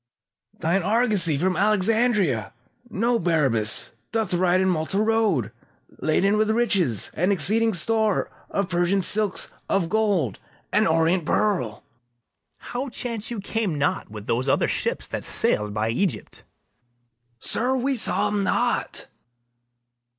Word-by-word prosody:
Thine 170 +5 +1
argosy 205 - +2
from 185 +4 +1
Alexandria, 210 - +1 0.4
Know, 235 +3 +1
Barabas, 135 -11 0 0.2
doth 220 -4 -1
ride 180 +1 +3
in 190 - +2
Malta 180 +2 0
road, 215 - +1 0.5
Laden 195 +6 +2
with 215 0 +2
riches, 195 - 0
and 180 +5 +1
exceeding 210 +5 +1
store 220 +4 0 0.2
Of 200 -2 -1
Persian 180 +2 +1
silks, 205 +1 -1 0.2
of 180 -4 +1
gold, 195 - +1 0.3
and - - +3
orient 165 +2 +2
pearl. 175 - 0
BARABAS. 120 0 -24
How 260 +3 -3
chance 230 -3 -4
you 235 -3 -4
came 200 -5 -2
not 145 - -1
with 105 -1 -9
those 125 +5 0
other - - +2
ships - - -1
That - - -5
sail'd 105 0 +3
by 105 +2 -1
Egypt? 175 - -2 1.0
SECOND 230 - 0
MERCHANT. 260 +1 +2
Sir, 245 - -3
we 275 -1 +1
saw 230 - 0
'em 205 -1 0
not. - - -1
190 Hz, 135 wpm, -24 LUFS, 155-220 Hz, 1.0 s, ride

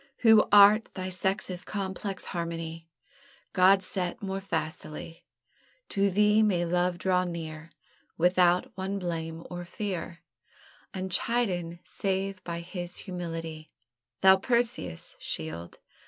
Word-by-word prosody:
Who 220 -2 +7
art 205 +2 +7
thy 185 -1 -3
sex's 185 0 -2
complex 195 -1 -4
harmony 165 -1 -4 0.7
God 190 +1 +5
set 180 -1 -3
more 195 -1 -4
facilely; 165 -2 -5 0.6
To 200 0 +2
thee 210 +3 +4
may 185 -5 +2
love 175 +1 +1
draw 185 0 +2
near 160 -2 -6 0.5
Without 180 +6 +3
one 190 +1 -3
blame 165 -3 -4
or 175 0 -5
fear, 175 -2 -5 0.7
Unchidden 185 -2 0
save 195 -1 -2
by 170 -1 -4
his 175 0 -6
humility: 165 -4 -6 0.5
Thou 190 0 +8
Perseus' 225 - -1
Shield! 80 +2 -6
180 Hz, 110 wpm, -28 LUFS, 170-195 Hz, 0.7 s, Thou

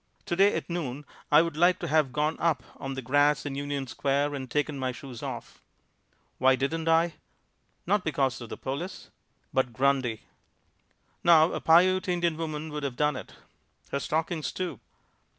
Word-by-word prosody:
Today 195 +4 +3
at - - -3
noon 150 -5 -4 0.3
I 150 +2 +7
would 165 -3 -4
like 175 +3 +4
to 170 - -5
have 155 -3 +2
gone 150 +5 0
up 160 -7 +1
on 135 0 -5
the 135 - -5
grass 145 +4 +3
in 145 - -3
Union 140 0 -3
Square 140 +3 0
and 130 -2 -5
taken 150 +1 -1
my 130 -1 -1
shoes 125 -2 -9
off. - - -7 0.8
Why 130 +1 +5
didn't 160 +5 -2
I? 165 -1 +3 0.7
Not 200 +1 +2
because 135 -5 0
of 120 - -8
the - - -6
police 145 +8 -5 0.4
but 130 -2 +1
Grundy. 130 -3 +1 1.0
Now 165 -1 +6
a - - -3
Piute 185 +4 +4
Indian 175 -2 +1
woman 155 -1 -4
could 150 0 -4
have 140 -3 -3
done 150 +2 +1
it. - - -9 0.6
Her 140 - 0
stockings 160 +2 -2
too. 185 -1 -4
150 Hz, 170 wpm, -28 LUFS, 135-165 Hz, 1.0 s, I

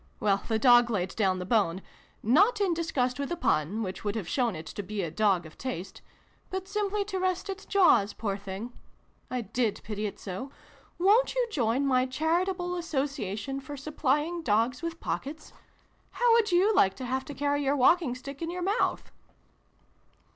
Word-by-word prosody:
Well, 200 -1 +2
the 225 - +1
dog 240 0 +6
laid 190 -5 -2
down 190 -4 +2
the 180 - -4
bone 190 -5 +2 0.4
not 395 - +4
in 390 -4 +2
disgust 275 -6 -1
with 280 - -2
the 345 - -1
pun, 205 - 0
which 190 -1 -5
would 205 0 -2
have 210 -7 -3
shown 240 -4 0
it 160 +1 -7
to 205 - -6
be 205 0 -4
a 165 - -3
dog 190 -1 +2
of 155 - -14
taste 200 -8 -5 0.5
but 380 0 -4
simply 410 0 -1
to 385 -2 -3
rest 370 +1 -1
its 395 +1 -8
jaws, 350 - +4
poor 205 -3 -3
thing! 200 +4 -7 0.6
I 250 -1 -2
did 230 0 -1
pity 210 0 -3
it 200 - -8
so! 195 +8 -6 0.5
Won't 420 +8 +4
you - - +1
join 255 - +1
my 255 -1 +2
Charitable 355 +6 0
Association 275 - -3
for 285 +1 -8
supplying 300 +3 -1
dogs 230 0 +1
with 335 0 -4
pockets? 305 +3 -5 0.6
How 485 -1 +3
would 455 -4 +3
you 375 +5 +4
like 195 - +4
to 260 - -6
have 260 +1 -1
to 290 - -8
carry 285 +1 0
your 275 +1 +2
walking 285 0 +3
stick 275 +3 -9
in 330 - -2
your 355 +1 -4
mouth 405 +5 0
265 Hz, 185 wpm, -28 LUFS, 215-345 Hz, 0.6 s, dog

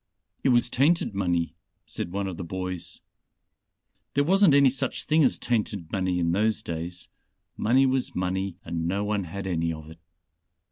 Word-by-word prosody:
"It - - +3
was 120 -1 +4
tainted 140 0 +2
money," 85 -5 0 0.3
said 85 - -5
one 100 +1 -2
of 95 -3 -5
the - - -4
boys. 90 0 -4 1.1
"There 140 - +4
wasn't 190 -1 +5
any 140 -2 +6
such 135 -1 -2
thing 155 0 +3
as 130 - +3
tainted 105 -7 -2
money 95 -2 0
in 85 -1 +1
those 110 +4 +1
days. 85 +2 -5 0.5
Money 130 +5 +3
was 130 -1 0
money 95 0 -1
and 85 0 -2
no 100 +3 0
one 105 -2 -1
had 95 +4 -6
any 85 -3 0
of 80 0 -8
it. 80 - -14
95 Hz, 170 wpm, -26 LUFS, 85-125 Hz, 1.1 s, any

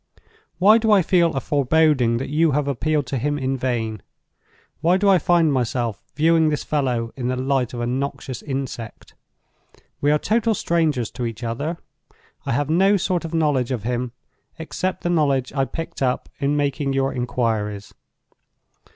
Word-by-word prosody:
Why 210 +5 +6
do 220 -1 +1
I 200 -3 +5
feel 170 -1 +3
a - - +1
foreboding 145 -4 +2
that 130 - -4
you 155 +1 +2
have 145 0 0
appealed 145 +2 0
to 130 0 -3
him 145 +3 -1
in 135 -1 -1
vain? 115 -5 -2 0.8
Why 170 +4 +3
do 200 +1 +1
I 190 -2 +6
find 170 -4 +3
myself 120 -3 -1
viewing 160 +1 +3
this 150 - -2
fellow 125 -6 -1
in 125 -2 -3
the 130 - 0
light 130 -1 0
of 120 - -4
a - - -1
noxious 135 0 -3
insect? 130 -5 -6 0.9
We 145 - +2
are 150 - +4
total 225 +6 +1
strangers 155 - 0
to 125 - -4
each 115 +1 -7
other; 140 +9 -3 0.7
I - - 0
have 145 +3 0
no 190 +6 +4
sort 180 -2 -1
of 165 0 -4
knowledge 145 -6 +1
of 125 -6 -3
him, 125 +1 -2 0.4
except 180 +3 -3
the 175 - 0
knowledge 140 -6 +1
I 135 -1 +1
picked 165 +5 -7
up 130 -1 0
in 140 +1 +1
making 140 -1 0
your 135 0 0
inquiries. 110 -5 -2
140 Hz, 170 wpm, -22 LUFS, 125-160 Hz, 0.9 s, Why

